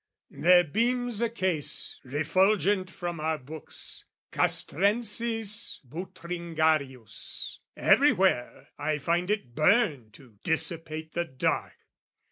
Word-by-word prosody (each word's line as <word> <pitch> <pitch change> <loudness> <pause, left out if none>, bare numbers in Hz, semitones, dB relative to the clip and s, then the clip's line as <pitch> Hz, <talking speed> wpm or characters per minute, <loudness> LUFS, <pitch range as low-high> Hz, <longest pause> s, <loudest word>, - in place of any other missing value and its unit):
There 175 +3 +5
beams 235 - 0
a 235 - +1
case 185 -9 -1
refulgent 185 +7 +1
from 175 -2 -5
our 160 0 -1
books 150 +3 -7 0.3
Castrensis, 215 +3 +2
Butringarius, 160 - -2 0.2
everywhere 190 - +2
I 150 +1 -1
find 170 +5 -1
it 205 - -2
burn 155 - +2
to 110 -4 -18
dissipate 160 -1 -1
the 175 0 -1
dark. 130 -5 -2
170 Hz, 95 wpm, -27 LUFS, 155-205 Hz, 0.3 s, There